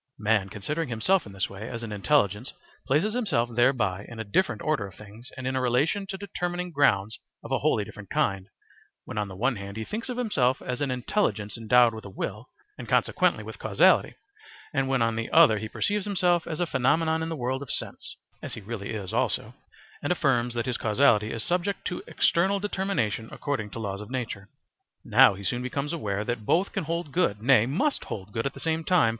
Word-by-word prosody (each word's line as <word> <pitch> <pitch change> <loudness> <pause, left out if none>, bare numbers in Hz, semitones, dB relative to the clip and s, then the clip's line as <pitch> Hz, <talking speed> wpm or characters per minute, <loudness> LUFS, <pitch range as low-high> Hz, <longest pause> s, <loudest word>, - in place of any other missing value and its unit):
Man 105 -2 +1
considering 150 - -3
himself 125 - +2
in - - -10
this 95 -1 -1
way 100 +3 -8
as 115 -1 -5
an 115 - -5
intelligence 105 0 +1 0.3
places 155 +11 +2
himself 175 - +1
thereby 115 -6 +2
in 115 -1 -9
a - - -2
different 150 - 0
order 150 -10 0
of 95 - -14
things 110 +4 -11
and 130 - -6
in 130 +1 -1
a 130 - +1
relation 140 +11 +1
to 195 0 -5
determining 180 -2 -3
grounds 110 -9 +2 0.2
of - - -9
a - - +2
wholly 105 - +2
different 100 -2 -11
kind 95 -1 0 0.6
when 105 - -4
on 105 - -1
the 95 - -9
one 125 +4 0
hand 100 +1 -7
he 110 - -4
thinks 225 - -5
of 250 - -3
himself 135 - +1
as 125 +2 -4
an 145 - 0
intelligence 125 - -1
endowed 115 +1 +4
with 110 - -8
a 100 - -8
will, 105 +4 -5 0.3
and - - -7
consequently - - +2
with - - -9
causality, - - +4 0.6
and 135 -2 +1
when 135 -3 +2
on 115 0 +1
the 115 0 -3
other 155 -10 +6
he 110 +1 -5
perceives 205 - -1
himself 180 -4 +2
as 155 - -4
a 175 - +2
phenomenon 160 +3 +2
in 160 - -2
the 165 - -3
world 130 0 -2
of 140 - -8
sense - - -4 0.3
(as - - -5
he - - -7
really 105 -1 -6
is 100 -4 -5
also), - - 0 0.5
and 145 - -1
affirms 125 -8 +1
that 115 -1 -1
his 125 -2 -2
causality 110 -1 +3
is 115 - -4
subject 180 +3 -1
to 180 - -3
external 190 +4 +2
determination 190 - -1
according 135 -8 -3
to 105 - -9
laws 100 -3 -4
of 105 - -9
nature. 115 -6 -4 0.6
Now 100 - +6
he 100 - -9
soon 120 +5 -1
becomes 140 +4 -3
aware 105 -9 -2
that 120 -2 -3
both 180 - +2
can - - -3
hold 165 -1 -3
good, 135 - +1
nay, 125 -3 +5
must 270 - 0
hold 100 -1 -6
good 115 +6 -1
at - - -6
the - - -9
same 160 0 -1
time. 175 -9 +4
125 Hz, 215 wpm, -27 LUFS, 105-160 Hz, 0.6 s, other